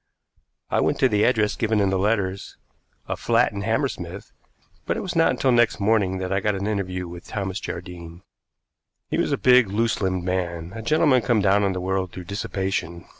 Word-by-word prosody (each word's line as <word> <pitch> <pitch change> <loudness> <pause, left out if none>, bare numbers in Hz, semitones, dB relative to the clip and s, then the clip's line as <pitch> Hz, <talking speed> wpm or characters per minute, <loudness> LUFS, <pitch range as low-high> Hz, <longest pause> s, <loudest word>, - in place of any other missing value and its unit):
I - - +2
went - - +1
to - - +6
the 105 0 +1
address 110 -4 +2
given 110 -1 0
in 100 -1 +2
the 95 - 0
letters 100 -2 -1 0.5
a - - -2
flat - - +2
in 100 - -5
Hammersmith 100 - -3 0.6
but - - 0
it - - -3
was 185 -2 -5
not 165 0 +4
until 130 - +1
next 120 -2 +3
morning 100 -2 +2
that 95 0 -3
I 95 - +2
got 105 +1 0
an 95 +1 -3
interview 90 -4 -2
with 85 0 -10
Thomas 95 -1 -3
Jardine. 85 -2 -8 0.9
He - - 0
was - - 0
a - - +1
big 125 -3 +5
loose 110 +4 0
limbed 95 -2 -1
man, 90 -1 -3
a 115 - -6
gentleman 145 0 +3
come 115 -1 +2
down 100 0 +3
in 100 -1 +1
the 90 - -3
world 95 0 -1
through 90 - -8
dissipation. 95 -2 -3
100 Hz, 200 wpm, -23 LUFS, 95-110 Hz, 0.9 s, to